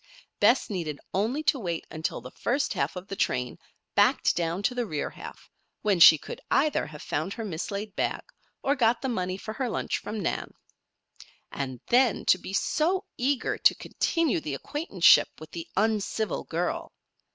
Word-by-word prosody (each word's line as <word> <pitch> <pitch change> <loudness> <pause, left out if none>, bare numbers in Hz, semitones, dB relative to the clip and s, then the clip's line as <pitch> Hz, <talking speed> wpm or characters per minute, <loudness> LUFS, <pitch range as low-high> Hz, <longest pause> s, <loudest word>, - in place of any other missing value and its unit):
Bess 255 - +4
needed 165 -8 -4
only 230 +10 0
to 280 - +2
wait 170 -6 -3
until 160 -5 -3
the 125 +2 -10
first 275 +4 -1
half - - -1
of 180 +1 -7
the 195 - -5
train 125 -9 -1 0.3
backed - - +3
down 170 +3 -1
to 250 - +1
the 245 -2 -2
rear 150 -5 -3
half, - - -11 0.4
when 200 -4 +2
she 160 -1 +10
could - - -9
either 290 - +2
have 150 0 -10
found 160 +7 -2
her 225 - -5
mislaid 200 +3 -4
bag, - - -1 0.4
or 280 - +3
got 240 -3 +2
the 265 - 0
money 185 -5 -2
for 215 +2 -6
her 255 +1 -2
lunch - - -2
from 215 - -5
Nan. 185 - -3 1.0
And 130 -3 -5
then 245 -1 +3
to 185 - +4
be - - -8
so 335 - +1
eager 265 +2 0
to - - +5
continue 330 - 0
the 150 -3 -4
acquaintanceship 280 - +3
with 155 0 -11
the 165 -1 -6
uncivil 215 +1 0
girl! - - -2
200 Hz, 175 wpm, -27 LUFS, 165-250 Hz, 1.0 s, she